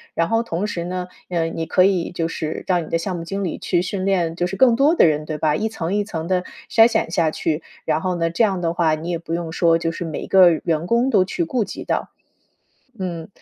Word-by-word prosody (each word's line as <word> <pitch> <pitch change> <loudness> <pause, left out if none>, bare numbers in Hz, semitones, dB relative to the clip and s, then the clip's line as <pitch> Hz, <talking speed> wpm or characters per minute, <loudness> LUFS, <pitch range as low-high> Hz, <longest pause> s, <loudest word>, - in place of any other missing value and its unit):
然 165 - +1
后 225 0 +2
同 200 -4 -3
时 180 -5 -3
呢， 180 0 -4 0.2
呃， 170 -2 0
你 165 0 -3
可 180 +3 +3
以 185 -3 +1
就 165 -2 -2
是 160 -1 -4
让 180 -2 +2
你 - - -10
的 165 - +1
项 180 +2 -3
目 170 - -5
经 195 +3 -4
理 175 - -3
去 175 -2 0
训 185 +1 -3
练， 175 -4 +1
就 175 +1 0
是 185 - -5
更 240 +3 +5
多 285 +6 +4
的 - - +6
人， 155 -1 +1
对 155 0 -4
吧？ 150 0 +1
一 220 +6 -1
层 185 -4 -3
一 205 - +1
层 165 -6 -5
地 185 0 +1 0.3
筛 225 0 +7
选 220 -8 -1
下 170 -3 +2
去， 155 0 -2 0.2
然 - - 0
后 185 0 -1
呢， 165 -1 0
这 225 - +2
样 195 -4 +1
的 165 -1 0
话， 165 -3 +2
你 160 +3 -6
也 170 -1 -1
不 165 0 -6
用 170 -1 -3
说 165 0 +3
就 165 0 -2
是 170 - -5
每 160 -3 -5
一 - - -7
个 185 -2 +7
员 165 +1 -1
工 235 +3 +2
都 210 -7 +4
去 185 -2 -2
顾 235 +7 0
及 - - -7
到。 - - -1 0.9
嗯。 170 -4 -5
175 Hz, 280 characters per minute, -21 LUFS, 165-195 Hz, 0.9 s, 筛